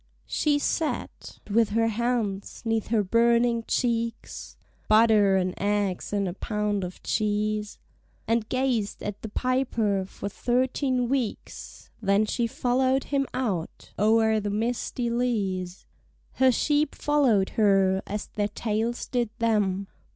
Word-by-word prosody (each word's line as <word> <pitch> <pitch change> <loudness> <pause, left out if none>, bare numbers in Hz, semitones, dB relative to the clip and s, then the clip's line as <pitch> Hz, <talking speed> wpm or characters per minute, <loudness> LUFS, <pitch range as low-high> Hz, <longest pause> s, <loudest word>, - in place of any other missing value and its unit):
She 295 -2 +1
sat, 310 +2 -3
with 220 +1 +2
her 225 +2 +2
hands 225 -3 -2
'neath 225 -1 0
her 220 -2 +2
burning 235 +3 +3
cheeks, 230 -1 -2 0.3
(Butter 215 -3 +5
and 185 -1 0
eggs 200 -2 -1
and 200 -2 0
a 175 - -3
pound 210 -1 -2
of 180 0 -7
cheese) 210 -1 -1 0.5
And 230 -1 0
gazed 255 -5 -1
at 205 0 -5
the 220 - -6
piper 230 -5 0
for 200 - -7
thirteen 255 +3 0
weeks; 250 -4 -4
Then 200 +1 +3
she 235 +2 -1
follow'd 260 +3 +1
him 275 -2 -1
out 200 -11 -4
o'er 220 +1 +3
the 205 0 -3
misty 235 +2 -2
leas. 195 -7 -2 0.5
Her 260 0 +4
sheep 295 +4 +1
follow'd 260 -10 +2
her, 195 -3 +3
as 210 +1 -4
their 205 -1 -2
tails 225 +2 -2
did 240 -3 -1
them. 205 -4 +1
220 Hz, 130 wpm, -26 LUFS, 205-245 Hz, 0.5 s, Butter